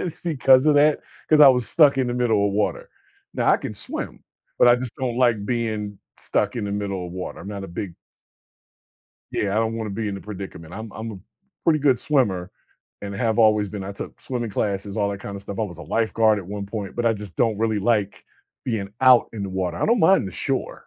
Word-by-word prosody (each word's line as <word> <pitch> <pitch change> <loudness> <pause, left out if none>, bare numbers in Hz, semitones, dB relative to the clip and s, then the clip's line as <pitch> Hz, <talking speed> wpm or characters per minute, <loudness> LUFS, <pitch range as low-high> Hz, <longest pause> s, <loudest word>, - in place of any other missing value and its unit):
it's 175 - -5
because 135 -4 +4
of 150 - +5
that, 150 +1 +4 0.3
'cause 155 -1 +5
I 140 - +10
was 125 -2 +3
stuck 145 -4 +5
in 130 - +1
the 120 - -2
middle 110 -5 +2
of 100 - -1
water. 105 +1 -1 0.4
Now, - - 0
I - - +5
can - - -6
swim, - - -6 0.3
but - - +6
I 120 - +7
just 125 -2 -5
don't 125 -4 -2
like 120 -5 +2
being 110 -4 -2 0.2
stuck - - -1
in 110 - -2
the 100 - -3
middle 100 -3 -3
of 85 - -9
water. 90 0 -6
I'm 100 - -9
not 100 -1 -5
a - - -8
big 90 0 -6 1.4
Yeah, 100 - -1
I - - -1
don't 115 0 0
wanna 110 -2 -4
be 105 +1 -3
in 100 - -3
the 100 - -7
predicament. 95 -5 -8
I'm 110 +1 -7
I'm 110 +1 -6
a 100 - -9 0.5
pretty 155 -2 +4
good 135 -4 +3
swimmer 105 -12 0 0.5
and 100 0 -5
have 110 +2 0
always 105 -2 +4
been. 100 -1 -6
I 100 - -5
took - - -9
swimming 120 -4 -4
classes, 100 0 -2
all 100 -2 +1
that 100 0 -6
kinda 100 -1 -7
stuff. 100 0 -7
I 110 - +1
was 85 -5 -5
a - - -8
lifeguard 110 -1 +2
at 95 - -8
one 100 +1 -5
point, 100 -2 -6
but 120 -1 0
I 115 - +4
just 105 -5 -8
don't 110 -3 +1
really 110 -1 +1
like 105 -1 0 0.4
being 105 -5 -2
out 130 -2 +6
in 110 -3 -5
the 100 - -4
water. 90 -2 -2
I - - 0
don't 235 0 +3
mind 175 - +4
the 95 - -7
shore, - - -3
105 Hz, 235 wpm, -23 LUFS, 100-120 Hz, 1.4 s, I